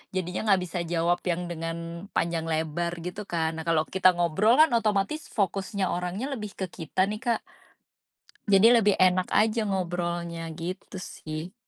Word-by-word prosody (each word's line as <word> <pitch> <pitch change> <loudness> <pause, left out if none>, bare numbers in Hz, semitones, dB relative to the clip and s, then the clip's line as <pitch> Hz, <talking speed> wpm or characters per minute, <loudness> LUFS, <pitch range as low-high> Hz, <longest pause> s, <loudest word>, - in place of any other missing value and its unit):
jadinya 185 +4 -2
nggak 190 - +4
bisa 175 +1 -4
jawab 175 +1 +1
yang 175 0 0
dengan, 170 +2 -5
panjang 165 -1 0
lebar, 160 +2 -1
gitu 180 +4 -5
kan. 160 -1 0
Nah, 160 - -4
kalau 160 -2 +2
kita 185 -1 +4
ngobrol 190 - +3
kan, 315 -2 +6
otomatis 220 +6 0
fokusnya 195 -1 -1
orangnya 185 +10 -3
lebih 210 -5 -6
ke 190 - -2
kita 180 +2 0
nih, 215 +2 -4
Kak 235 -3 0 1.1
jadi 205 +4 +6
lebih 205 -1 +4
enak 185 0 +3
aja 220 +1 +3
ngobrolnya, 175 -3 -2
gitu 180 +3 -6
sih. 160 0 -7
180 Hz, 155 wpm, -27 LUFS, 170-205 Hz, 1.1 s, kan